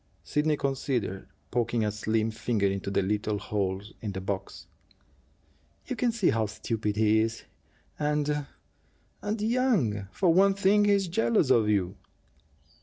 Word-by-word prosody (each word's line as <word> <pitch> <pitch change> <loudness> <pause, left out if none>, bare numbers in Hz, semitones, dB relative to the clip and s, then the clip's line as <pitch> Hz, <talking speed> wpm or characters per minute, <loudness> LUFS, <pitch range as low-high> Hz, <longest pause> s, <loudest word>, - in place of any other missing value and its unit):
Sidney 150 0 +1
considered, 130 -8 -2 0.2
poking 120 -2 0
a 105 - 0
slim 110 +1 0
finger 110 -2 -1
into 100 0 -1
the 100 - +1
little 105 +2 -1
holes 100 0 -3
in 105 -3 -4
the 95 - -4
box. 95 0 -5 1.2
"You 255 - -3
can 240 0 +1
see 220 -5 +2
how 110 -1 0
stupid 110 0 -3
he 110 0 +3
is, 115 +1 -1 0.6
and 150 -1 0 0.7
and 210 +2 -2
young. 210 - +1
For 180 -4 +2
one 195 +2 +5
thing, 200 +1 +4
he's 200 -2 +3
jealous 190 - +2
of 115 -4 +4
you!" 95 -4 0
115 Hz, 140 wpm, -28 LUFS, -, 1.2 s, one